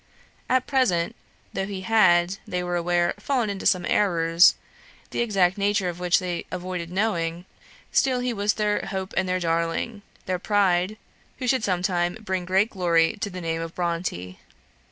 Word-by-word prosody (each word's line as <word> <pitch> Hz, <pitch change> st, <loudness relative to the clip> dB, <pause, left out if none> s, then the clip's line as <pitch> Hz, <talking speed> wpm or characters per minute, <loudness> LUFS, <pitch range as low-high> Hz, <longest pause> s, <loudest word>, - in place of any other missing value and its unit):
At 255 Hz, 0 st, +2 dB
present, 225 Hz, -12 st, +1 dB, 0.4 s
though 195 Hz, 0 st, -2 dB
he 195 Hz, -2 st, -5 dB
had, 185 Hz, -3 st, +3 dB
they 180 Hz, 0 st, -2 dB
were 175 Hz, 0 st, -2 dB
aware, 175 Hz, 0 st, +1 dB
fallen 245 Hz, -7 st, 0 dB
into 195 Hz, -, -2 dB
some 180 Hz, -2 st, +2 dB
errors, 170 Hz, -3 st, +4 dB, 0.6 s
the -, -, -3 dB
exact 195 Hz, -4 st, +2 dB
nature 200 Hz, -2 st, +1 dB
of 175 Hz, 0 st, -7 dB
which 180 Hz, 0 st, +3 dB
they 180 Hz, -2 st, -3 dB
avoided 180 Hz, -2 st, -5 dB
knowing, 175 Hz, -4 st, -1 dB, 0.5 s
still 260 Hz, -2 st, +2 dB
he 245 Hz, -1 st, -1 dB
was 205 Hz, 0 st, 0 dB
their 210 Hz, -1 st, 0 dB
hope 190 Hz, -1 st, -4 dB
and 185 Hz, -1 st, 0 dB
their 185 Hz, 0 st, +1 dB
darling; 170 Hz, +6 st, -1 dB, 0.2 s
their 185 Hz, -1 st, -1 dB
pride, 195 Hz, 0 st, +1 dB, 0.4 s
who 255 Hz, -, -4 dB
should 255 Hz, -2 st, +2 dB
some 180 Hz, -3 st, 0 dB
time 175 Hz, 0 st, 0 dB
bring 190 Hz, -4 st, -3 dB
great 190 Hz, +5 st, +2 dB
glory 170 Hz, -4 st, +2 dB
to 210 Hz, -, -1 dB
the 180 Hz, -1 st, -7 dB
name 165 Hz, -1 st, -2 dB
of 165 Hz, 0 st, -6 dB
Bronte. 170 Hz, -, -3 dB
185 Hz, 170 wpm, -24 LUFS, 175-205 Hz, 0.6 s, errors